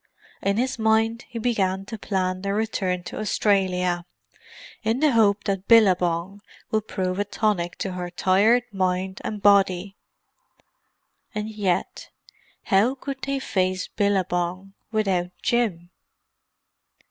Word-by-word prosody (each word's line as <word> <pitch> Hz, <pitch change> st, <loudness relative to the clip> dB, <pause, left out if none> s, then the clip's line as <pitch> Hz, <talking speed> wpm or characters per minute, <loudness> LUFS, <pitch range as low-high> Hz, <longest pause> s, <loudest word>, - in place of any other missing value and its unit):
In 200 Hz, +1 st, 0 dB
his 255 Hz, 0 st, -1 dB
mind 225 Hz, +1 st, +2 dB
he 240 Hz, -, -7 dB
began 195 Hz, -5 st, 0 dB
to 225 Hz, -, -6 dB
plan 185 Hz, -3 st, -2 dB
their 200 Hz, +1 st, -2 dB
return 190 Hz, -5 st, -1 dB
to -, -, -7 dB
Australia, 185 Hz, -4 st, +1 dB, 0.7 s
in 225 Hz, +2 st, 0 dB
the 300 Hz, 0 st, +4 dB
hope 210 Hz, -3 st, +3 dB
that 195 Hz, -1 st, -2 dB
Billabong 185 Hz, -3 st, +3 dB, 0.3 s
would 215 Hz, 0 st, 0 dB
prove 185 Hz, 0 st, -2 dB
a -, -, +2 dB
tonic 205 Hz, -4 st, -1 dB
to 190 Hz, -, -3 dB
her 180 Hz, -1 st, -5 dB
tired 200 Hz, +7 st, +3 dB
mind 190 Hz, 0 st, -1 dB
and 210 Hz, -2 st, -5 dB
body. 195 Hz, -1 st, +3 dB, 1.4 s
And 210 Hz, +1 st, -3 dB
yet—how 205 Hz, +3 st, -2 dB
could 275 Hz, 0 st, -6 dB
they 275 Hz, 0 st, -1 dB
face 185 Hz, -7 st, -1 dB
Billabong, 185 Hz, -1 st, -1 dB, 0.2 s
without 195 Hz, -5 st, 0 dB
Jim? 200 Hz, -8 st, 0 dB
200 Hz, 120 wpm, -24 LUFS, 185-220 Hz, 1.4 s, the